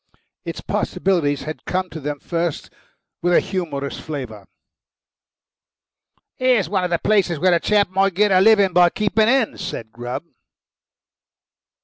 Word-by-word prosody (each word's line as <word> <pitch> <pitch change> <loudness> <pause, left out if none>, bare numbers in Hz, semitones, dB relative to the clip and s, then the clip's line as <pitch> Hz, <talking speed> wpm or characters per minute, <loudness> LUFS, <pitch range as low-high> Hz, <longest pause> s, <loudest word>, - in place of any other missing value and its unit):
Its - - -5
possibilities 155 -7 -1
had 155 +1 -7
come 185 0 -1
to 160 -2 -8
them 145 0 -4
first 170 -1 -3 0.5
with 175 +1 +1
a - - +6
humorous 155 -7 -4
flavour. 125 -10 -7 1.9
"Here's 250 -7 +2
one 190 +1 -1
of 180 - -1
the 170 - +1
places 195 -4 +1
where 185 +4 +3
a 170 - +3
chap 205 +2 +2
might 195 -1 +1
get 210 +1 +3
a 185 0 +5
living 200 -3 +5
by 180 -1 +6
keeping 215 +3 +1
hens," 255 -4 +1
said 115 -11 -6
Grubb. 120 +5 -6
180 Hz, 140 wpm, -21 LUFS, 150-200 Hz, 1.9 s, a